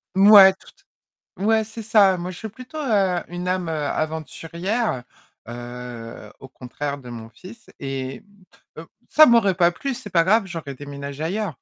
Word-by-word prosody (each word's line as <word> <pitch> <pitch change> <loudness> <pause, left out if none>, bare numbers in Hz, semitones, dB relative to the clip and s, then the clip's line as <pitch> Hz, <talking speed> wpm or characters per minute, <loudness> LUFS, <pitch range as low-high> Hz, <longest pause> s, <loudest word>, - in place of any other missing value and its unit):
Mouais, 195 -1 +9
toute 395 - -21 0.6
ouais, 220 0 +3
c'est 220 +1 -9
ça. 205 -4 +4
Moi 175 +1 -5
je 180 - -9
suis 220 - -6
plutôt, 255 +8 -10
heu, 200 - +1
une 175 +1 -6
âme, 185 -2 -1
heu, - - -2
aventurière, 165 - -3 0.5
heu, 120 -2 -9
au - - -11
contraire 140 +3 -6
de 125 -3 -11
mon 115 -2 -8
fils 195 - -14
et 135 -1 -5 0.6
heu, - - -8 0.3
ça 310 0 +9
m'aurait 230 -6 +4
pas 170 0 +3
plu, 275 +9 -4
c'est 240 -3 -9
pas 170 -2 +3
grave, 210 +2 +3
j'aurais 165 -6 -7
déménagé 140 +1 -8
ailleurs. 195 +5 -2
175 Hz, 165 wpm, -22 LUFS, 140-215 Hz, 0.6 s, Mouais